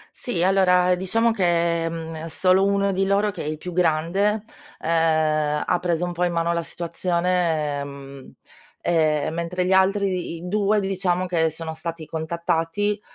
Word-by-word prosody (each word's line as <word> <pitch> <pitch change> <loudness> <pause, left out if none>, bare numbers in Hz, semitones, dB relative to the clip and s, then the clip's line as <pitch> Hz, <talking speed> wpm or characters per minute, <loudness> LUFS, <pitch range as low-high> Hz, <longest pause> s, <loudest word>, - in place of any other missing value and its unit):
Sì. 225 -9 -2
Allora, 180 -1 +4
diciamo 225 +6 +2
che, 170 -4 +1
mhmm, 165 -1 -6
solo 185 +3 +3
uno 200 0 +1
di 195 +1 0
loro 200 +1 +2
che 205 - -7
è - - -6
il 155 0 -2
più 180 +3 -7
grande, 180 +5 +1 0.4
uhm, 155 -2 +1
ha 180 - +2
preso 175 -1 0
un 175 - -3
po' 175 +1 -1
in 175 - 0
mano 170 0 +1
la 170 0 -1
situazione, 170 -3 -1
ehm, 140 -1 -9 1.0
mentre 170 +2 -2
gli 185 - 0
altri 190 -2 +2
i 175 +2 -8
2 210 +1 +2
diciamo 185 -2 0
che 165 -3 +1
sono 160 +1 -6
stati 165 0 -6
contattati, 170 +5 -2
175 Hz, 155 wpm, -23 LUFS, 165-190 Hz, 1.0 s, Allora